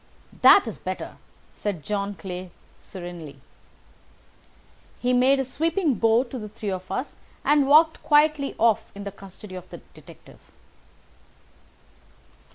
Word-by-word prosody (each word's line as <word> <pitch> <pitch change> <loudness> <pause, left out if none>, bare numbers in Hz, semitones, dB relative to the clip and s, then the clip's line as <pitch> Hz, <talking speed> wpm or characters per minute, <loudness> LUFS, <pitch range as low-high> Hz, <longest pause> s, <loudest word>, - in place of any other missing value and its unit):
"That - - +7
is - - -6
better," - - -6 0.3
said 195 -7 -4
John 205 -1 -3
Clay 185 -1 -7 0.3
serenely. 175 -6 -9 1.6
He 250 0 +1
made 260 +2 +4
a 270 - 0
sweeping 325 +4 0
bow 225 +1 +3
to 255 0 -7
the 210 -1 -7
three 210 -1 -5
of 185 0 -6
us 265 - -3 0.3
and 290 -2 +4
walked 315 +3 +5
quietly 295 -1 +3
off 225 -2 +2
in 200 - -7
the 200 - -5
custody 195 0 -13
of 185 -1 -9
the - - -9 0.2
detective. - - -16
220 Hz, 130 wpm, -24 LUFS, 190-275 Hz, 1.6 s, That